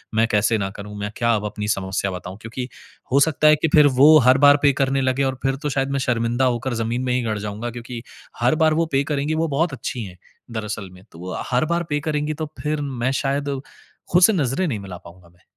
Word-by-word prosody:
मैं 115 +1 +3
कैसे 110 +2 +2
ना 95 -2 -2
करूँ? 105 +1 -9
मैं 105 0 -4
क्या 115 -1 +2
अब 105 -1 -3
अपनी 105 0 -4
समस्या 95 -1 -1
बताऊँ 90 +2 -7
क्योंकि 120 +3 -6 0.4
हो 140 - +4
सकता 155 0 +3
है 155 - +7
कि 150 - 0
फिर 150 -1 +7
वो 155 +2 +9
हर 130 +1 +6
बार 145 0 +6
पे 140 -1 +5
करने 135 0 +1
लगे 130 +1 +1
और 130 -1 -2
फिर 135 0 +1
तो 150 - 0
शायद 135 0 -1
मैं 140 - 0
शर्मिंदा 120 0 0
होकर 125 +1 -1
ज़मीन 120 +3 -2
में 125 - 0
ही 125 - +1
गड़ 110 -2 -2
जाऊँगा 105 +3 -5
क्योंकि 120 0 -7 0.4
हर 125 +5 +3
बार 155 0 +4
वो - - +1
पे 135 +1 +3
करेंगी 145 +2 -1
वो 165 +1 0
बहुत 155 +1 0
अच्छी 120 -1 -4
हैं 90 -2 -10 0.3
दरअसल 105 -3 -5
में, 90 +1 -16
तो 85 - -14
वो 90 +1 -6 0.2
हर 125 +5 +2
बार 170 +1 0
पे 145 0 0
करेंगी 150 0 -1
तो 155 +1 -5
फिर 150 0 -2
मैं 130 -2 -2
शायद 140 0 -1 0.5
खुद 180 +1 +4
से 220 - +7
नज़रे 150 +2 0
नहीं 115 -9 -2
मिला 95 -3 -8
पाऊँगा 85 0 -16
मैं। 85 0 -28
125 Hz, 245 wpm, -22 LUFS, 105-145 Hz, 0.5 s, वो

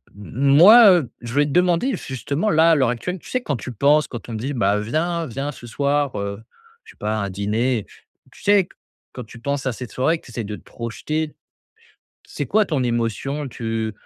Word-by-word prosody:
m 100 0 -11 0.2
moi, 210 +8 +9
heu, 160 -10 +2
je 120 -1 -7
vais 145 0 +4
te 145 - -4
demander, 180 - +2
justement 140 - -3
là, 165 -1 +5
à - - +5
l'heure 130 -5 +2
actuelle, 180 +10 -3
tu - - -14
sais, 255 - -1
quand 145 - -2
tu 125 +3 -7
penses, 145 +6 +3
quand 120 - -8
on - - -5
me - - -3
dit: 135 +6 -3
«Bah, 105 -5 +1
viens 165 +9 -1
viens 135 +4 -4
ce 120 -4 -12
soir, 140 +2 0
heu», 100 +1 -4 0.4
je - - -13
sais - - -32
pas 105 +1 -2
un 100 -2 -2
dîner. 105 +4 -1 0.5
Tu - - -17
sais 200 -3 +4 0.5
quand 125 - -7
tu 115 - -13
penses 140 +3 -3
à 130 - 0
cette 120 -1 -8
soirée 160 +9 +1
que - - -23
tu 125 - -13
essaies 115 -1 -4
de 105 +1 -5
te - - -15
projeter. 150 +7 -4 0.9
C'est 145 - -4
quoi 215 +7 +3
ton 150 -7 -1
émotion? 120 +5 -2
Tu 115 -2 -3
135 Hz, 220 wpm, -21 LUFS, 115-155 Hz, 0.9 s, moi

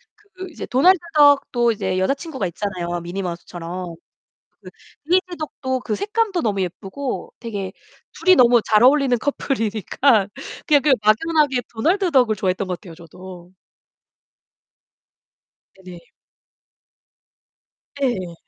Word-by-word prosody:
그 380 -3 -11
이제 320 - -8
도날드 355 +10 +4 0.2
덕도 275 -5 +4
이제 190 -4 -2
여자친구가 275 - -2
있잖아요, 175 -1 -4
미니 175 +3 -5
마우스처럼. 175 0 -6 0.7
그 - - -12 0.4
데이지 365 -1 +1
덕도 260 -4 -4
그 225 -3 -3
색감도 420 - -1
너무 205 -4 -1
예쁘고 195 +9 -5
되게 200 -5 -5 0.4
둘이 370 +2 +4
너무 240 -2 +5
잘 215 0 +3
어울리는 265 -1 +4
커플이니까 225 -3 0 0.4
그냥 290 -2 +4
그 295 -2 +3
막연하게 270 +4 +2
도널드 350 - +1
덕을 250 -7 +3
좋아했던 190 0 -1
것 180 -1 -5
같아요. 175 -5 -12
저도. 180 +1 -13 2.3
네네. 180 -2 -11 2.0
네. 190 -10 -1
235 Hz, 265 characters per minute, -21 LUFS, 185-290 Hz, 2.3 s, 너무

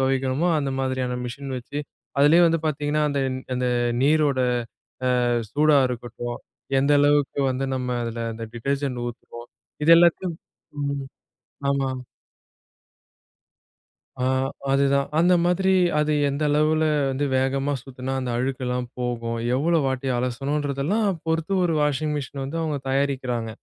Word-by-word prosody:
தொவைக்கிறோமோ, 135 +4 +1
அந்த 140 -2 -1
மாதிரியான 130 -1 -1
மிஷின் 135 +3 -6
வச்சு, 135 +4 -7 0.4
அதிலேயும் 165 +4 +6
வந்து 165 -1 +1
பாத்தீங்கன்னா, 150 0 0
அந்த 140 - -1 0.4
அந்த 125 0 -1 0.4
நீரோட 145 -1 +3 0.9
அ - - +1 0.2
சூடா 150 0 +4
இருக்கட்டும், 120 0 -5 0.4
எந்த 140 +2 +3
அளவுக்கு 145 -1 +2
வந்து 130 +1 -1
நம்ம 125 -1 -3
அதில, 115 0 -4
அந்த 115 0 -6
டிடர்ஜென்ட் 135 +1 -2
ஊத்துறோம், 120 0 -9 0.4
இது 165 - +8
எல்லாத்தையும் 170 0 +3 0.5
ம், 140 -1 -2 0.7
ஆமா. 135 -1 0 2.3
ஆ. - - +2 0.5
அதுதான். 140 0 +2
அந்த 175 +2 +5
மாதிரி 190 +2 +2 0.3
அது 150 0 +1 0.2
எந்த 140 +2 -2
அளவில 155 +2 +2 0.3
வந்து 135 +2 -1
வேகமா 135 +2 0
சுத்துனா, 130 0 -6
அந்த 125 -1 -3
அழுக்குலாம் 125 -1 -2
போகும். 115 -1 -2 0.2
எவ்வளோ 165 +5 +2
வாட்டி 130 0 -2
அலசனுன்றதெல்லாம் 140 - -1 0.2
பொறுத்து, 160 +3 -1
ஒரு 165 - +1
வாஷிங் 150 +1 0
மிஷின் 140 -1 -6
வந்து 140 +5 -4
அவுங்க 155 -3 -1
தயாரிக்கிறாங்க, 130 -4 -1
140 Hz, 125 wpm, -24 LUFS, 130-150 Hz, 2.3 s, இது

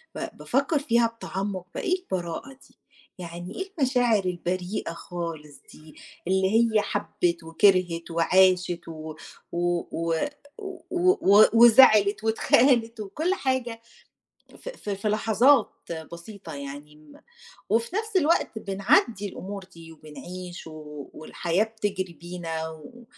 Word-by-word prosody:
ب - - -6
بافكر 280 +4 0
فيها 235 -4 +2
بتعمُّق 195 -4 -5
بقى، - - -4
إيه 370 -1 0
البراءة 180 - -5 0.2
دي؟ - - -28 0.4
يعني 175 +2 -8
إيه 385 +1 -5
المشاعر 245 -7 +2
البريئة 180 +1 -3
خالص 165 -4 -7
دي؟ 155 0 -16 0.3
اللي 190 0 +2 0.3
هي 215 - +5
حَبِت 175 -5 -2
وكِرْهِت 170 0 +2
وعاشت 180 +1 +3
و 155 -1 -8 0.4
و 175 0 0
و 165 0 -1 0.8
و 360 +1 +4
و 205 - +6
وزعلت 220 -3 +7
واتخانت، 230 +1 +3
وكُلّ 300 - -1
حاجة، 260 -8 -2 0.8
ف - - -8
ف - - -7
في 200 +2 -2
لحظات 225 +6 +3 0.4
بسيطة 170 -1 -9
يعني، 145 +1 -9
م 150 -1 -18 0.5
وفي 230 - 0
نفْس 435 -2 -1
الوقت 315 -8 +1
بنعدِّي 205 +1 +1
الأمور 195 +1 -7
دي 165 -1 -13
وبنعيش 175 +4 -9
و 150 -2 -10
والحياة 170 +4 -1
بتجري 205 -5 -4
بينا، 165 -2 -5
و 160 +11 -13
190 Hz, 120 wpm, -26 LUFS, 170-230 Hz, 0.8 s, وزعلت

